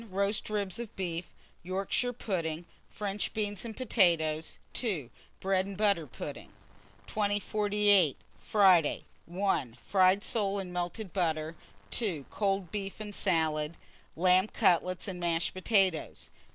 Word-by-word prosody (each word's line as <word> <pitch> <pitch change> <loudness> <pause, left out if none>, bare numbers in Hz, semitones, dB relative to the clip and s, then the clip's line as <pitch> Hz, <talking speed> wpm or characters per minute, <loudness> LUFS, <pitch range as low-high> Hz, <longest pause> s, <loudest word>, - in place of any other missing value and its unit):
Roast 200 +3 -1
ribs 205 -1 -1
of 235 -3 -7
beef, 175 -2 -4 0.3
Yorkshire 195 +7 -1
pudding, 170 -8 -3 0.2
French 205 -1 -3
beans 205 -3 -2
and 225 -2 -7
potatoes. 165 -10 +2 0.2
2. 175 - -1 0.3
Bread 190 0 +1
and 200 -2 -7
butter 200 -7 +2
pudding. - - -7 0.6
2048. 205 -4 +2 0.2
Friday. 185 -7 +4 0.2
1. 175 - -1
Fried 190 +1 +3
soles 200 -3 +1
and 180 -2 -8
melted 180 +3 -4
butter. 160 -3 0 0.4
2. 175 - -1
Cold 195 -4 -1
beef 195 -1 -4
and 210 -1 -6
salad, 160 -5 0 0.4
lamb 185 +3 +4
cutlets 185 -4 +2
and 185 -2 -5
mashed 170 -1 0
potatoes. 185 -3 +1
190 Hz, 120 wpm, -30 LUFS, 170-205 Hz, 0.6 s, Friday